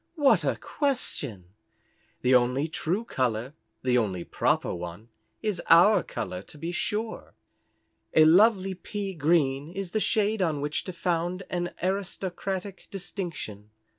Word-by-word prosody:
"What 290 Hz, -4 st, +4 dB
a -, -, +1 dB
question! 140 Hz, -, -2 dB, 0.7 s
The 130 Hz, +1 st, +4 dB
only 125 Hz, +4 st, +3 dB
true 180 Hz, +7 st, -2 dB
colour 125 Hz, -, -1 dB, 0.3 s
the 125 Hz, -1 st, +3 dB
only 95 Hz, -6 st, -2 dB
proper -, -, 0 dB
one 90 Hz, +6 st, -7 dB, 0.3 s
is 210 Hz, -5 st, -1 dB
our 175 Hz, +6 st, +7 dB
colour 90 Hz, 0 st, -5 dB
to 150 Hz, -, -15 dB
be 165 Hz, +3 st, -4 dB
sure. 215 Hz, +5 st, -3 dB, 0.8 s
A 155 Hz, -, +8 dB
lovely 195 Hz, +3 st, +5 dB
pea 195 Hz, +1 st, -5 dB
green 145 Hz, -3 st, +2 dB
is 195 Hz, -1 st, -5 dB
the 215 Hz, -, +1 dB
shade 215 Hz, -1 st, +1 dB
on 160 Hz, -5 st, +1 dB
which 145 Hz, +2 st, -2 dB
to 185 Hz, -, -5 dB
found 175 Hz, +2 st, -1 dB
an 175 Hz, -1 st, -2 dB
aristocratic 190 Hz, 0 st, -3 dB
distinction. 170 Hz, -, -6 dB
175 Hz, 135 wpm, -27 LUFS, 130-195 Hz, 0.8 s, A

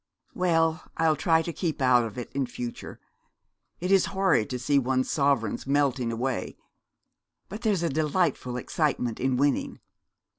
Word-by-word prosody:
'Well, 165 Hz, -2 st, +1 dB
I'll 160 Hz, -1 st, +3 dB
try 160 Hz, +2 st, +2 dB
to 170 Hz, -, -5 dB
keep 165 Hz, -3 st, -3 dB
out 125 Hz, -2 st, +4 dB
of 110 Hz, 0 st, -8 dB
it 120 Hz, -, -6 dB
in 135 Hz, -2 st, -1 dB
future. 120 Hz, -1 st, -7 dB, 0.8 s
It 180 Hz, +2 st, -2 dB
is 195 Hz, -1 st, +5 dB
horrid 190 Hz, -, +2 dB
to 125 Hz, -, -3 dB
see 140 Hz, +3 st, +2 dB
one's 130 Hz, 0 st, 0 dB
sovereigns 140 Hz, -2 st, 0 dB
melting 135 Hz, -4 st, +1 dB
away; 125 Hz, +3 st, -3 dB, 0.9 s
but 210 Hz, +4 st, -7 dB
there's 205 Hz, -7 st, +1 dB
a -, -, +2 dB
delightful 150 Hz, -4 st, 0 dB
excitement 125 Hz, -3 st, -1 dB
in 130 Hz, 0 st, +1 dB
winning.' 140 Hz, +1 st, 0 dB
140 Hz, 150 wpm, -27 LUFS, 125-165 Hz, 0.9 s, is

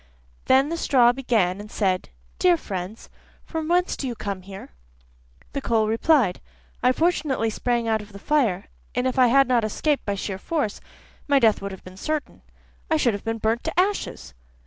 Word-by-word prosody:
Then 265 Hz, +2 st, +4 dB
the 335 Hz, -, -2 dB
straw 245 Hz, -7 st, +4 dB
began 220 Hz, -8 st, 0 dB
and 210 Hz, -, -11 dB
said: 190 Hz, -4 st, -1 dB, 0.3 s
'Dear 355 Hz, -2 st, +4 dB
friends, 195 Hz, -, -6 dB, 0.4 s
from 320 Hz, -1 st, -4 dB
whence 355 Hz, +1 st, +2 dB
do 270 Hz, -, -4 dB
you 240 Hz, -, -4 dB
come 200 Hz, -3 st, -4 dB
here?' 195 Hz, +1 st, -10 dB, 0.8 s
The 280 Hz, -, -2 dB
coal 225 Hz, -4 st, +1 dB
replied: 230 Hz, -, +2 dB, 0.4 s
'I 250 Hz, +1 st, +4 dB
fortunately 295 Hz, -8 st, +1 dB
sprang 235 Hz, +1 st, -1 dB
out 220 Hz, -1 st, +1 dB
of 210 Hz, 0 st, -13 dB
the 200 Hz, -, -10 dB
fire, 225 Hz, -6 st, +1 dB, 0.3 s
and 250 Hz, +1 st, 0 dB
if 260 Hz, 0 st, 0 dB
I 250 Hz, -, +7 dB
had 275 Hz, +2 st, +5 dB
not 245 Hz, -3 st, +2 dB
escaped 285 Hz, +7 st, 0 dB
by 200 Hz, -, -2 dB
sheer 195 Hz, -1 st, -4 dB
force, 290 Hz, -, -2 dB, 0.5 s
my 285 Hz, -1 st, +4 dB
death 225 Hz, -5 st, +3 dB
would 200 Hz, 0 st, -4 dB
have 190 Hz, -, -10 dB
been 185 Hz, 0 st, -12 dB
certain, 305 Hz, +7 st, -3 dB, 0.5 s
I 315 Hz, -, +3 dB
should 245 Hz, -7 st, +2 dB
have 200 Hz, -, -5 dB
been 225 Hz, 0 st, -2 dB
burnt 225 Hz, +2 st, 0 dB
to 320 Hz, +2 st, -1 dB
ashes. 365 Hz, -, -1 dB
235 Hz, 190 wpm, -24 LUFS, 205-285 Hz, 0.8 s, I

